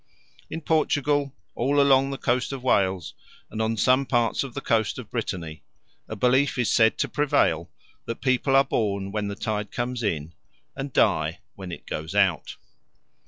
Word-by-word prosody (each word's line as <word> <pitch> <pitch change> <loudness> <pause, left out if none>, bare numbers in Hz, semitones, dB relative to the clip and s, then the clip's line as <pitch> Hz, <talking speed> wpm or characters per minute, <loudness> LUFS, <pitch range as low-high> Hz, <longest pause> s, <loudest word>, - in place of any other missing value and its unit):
In 165 - -5
Portugal, 145 -2 +1 0.2
all 140 +4 +1
along 135 -1 +4
the 135 - -4
coast 125 -1 0
of 135 -2 -6
Wales, 95 -8 +1 0.4
and 110 - -3
on 110 0 0
some 130 +4 +3
parts 120 -1 +1
of 135 -3 -8
the - - -2
coast 110 -4 0
of - - -9
Brittany, 80 -3 -4 0.5
a 110 - -4
belief 130 +5 +2
is 120 - +1
said 110 -1 +4
to - - 0
prevail 145 -1 +1 0.4
that 115 - -5
people 130 +1 +1
are 135 - +7
born 100 -7 -1
when 105 0 -2
the 100 - -4
tide 105 -1 -3
comes 125 0 -3
in, 85 -6 -2 0.4
and 135 0 -5
die 80 -7 +2 0.2
when 95 -2 -8
it - - -9
goes 80 +1 -5
out. - - +1
120 Hz, 170 wpm, -25 LUFS, 100-135 Hz, 0.5 s, are